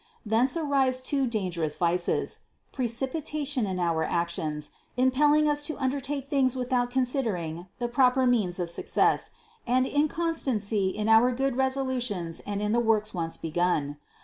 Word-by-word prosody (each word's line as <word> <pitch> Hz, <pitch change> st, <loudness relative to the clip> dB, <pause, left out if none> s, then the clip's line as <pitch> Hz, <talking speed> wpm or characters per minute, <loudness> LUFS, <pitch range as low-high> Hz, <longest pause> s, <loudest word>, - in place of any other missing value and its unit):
Thence 235 Hz, +7 st, +2 dB
arise 275 Hz, -5 st, +1 dB
two 270 Hz, +1 st, 0 dB
dangerous 180 Hz, -9 st, -2 dB
vices: 175 Hz, 0 st, 0 dB, 0.3 s
precipitation 265 Hz, +1 st, -2 dB
in 185 Hz, -1 st, -3 dB
our 165 Hz, -2 st, +1 dB
actions, 165 Hz, -3 st, -2 dB, 0.3 s
impelling 290 Hz, +4 st, +4 dB
us 295 Hz, 0 st, +1 dB
to 310 Hz, -, -4 dB
undertake 275 Hz, +1 st, -2 dB
things 270 Hz, -3 st, +2 dB
without 250 Hz, -1 st, 0 dB
considering 225 Hz, -, -1 dB
the 240 Hz, -, -2 dB
proper 255 Hz, +1 st, +3 dB
means 215 Hz, -8 st, +2 dB
of 175 Hz, -1 st, -1 dB
success, -, -, +1 dB, 0.4 s
and 255 Hz, +2 st, +3 dB
incon 310 Hz, +4 st, 0 dB
stancy 210 Hz, -9 st, 0 dB
in 210 Hz, +1 st, -3 dB
our 225 Hz, +3 st, +6 dB
good 265 Hz, +1 st, -1 dB
resolutions 255 Hz, -10 st, -1 dB
and 205 Hz, 0 st, -2 dB
in 210 Hz, -, 0 dB
the 235 Hz, -, +3 dB
works 215 Hz, -2 st, +1 dB
once 165 Hz, -3 st, -3 dB
begun. 160 Hz, -3 st, -1 dB
245 Hz, 145 wpm, -27 LUFS, 185-265 Hz, 0.4 s, our